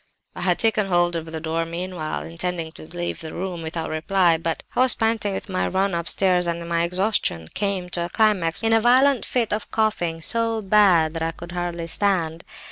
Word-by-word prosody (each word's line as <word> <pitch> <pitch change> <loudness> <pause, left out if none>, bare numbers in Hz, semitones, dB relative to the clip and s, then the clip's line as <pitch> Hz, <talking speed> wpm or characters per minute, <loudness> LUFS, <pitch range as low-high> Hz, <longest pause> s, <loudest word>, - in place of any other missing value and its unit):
"I - - -6
had 180 -1 +3
taken 220 -3 +2
hold 175 -1 +2
of 165 -1 -5
the 160 - -4
door 160 +1 -3
handle 165 0 -3
meanwhile, 175 -3 -4
intending 165 0 -4
to 155 - -11
leave 175 +1 -4
the 160 -1 -7
room 180 -1 -4
without 160 0 -4
reply; 170 +2 +2
but 165 0 -3
I - - 0
was 255 -1 +7
panting 225 -2 0
with 195 - -5
my 185 -2 -1
run 195 0 0
upstairs, 180 +1 +1
and 170 0 -3
my 170 0 0
exhaustion 180 - -1
came 195 -3 -2
to 175 -1 -2
a - - -6
climax 200 -6 +1
in 225 0 +3
a 225 - +4
violent 255 +2 +4
fit 235 -4 0
of 210 - -3
coughing, 175 -7 0
so 230 +3 +1
bad 190 -6 +4
that 165 - -4
I 165 - 0
could 170 +1 -10
hardly 175 -1 -3
stand. 170 -2 0
175 Hz, 210 wpm, -23 LUFS, 165-205 Hz, -, was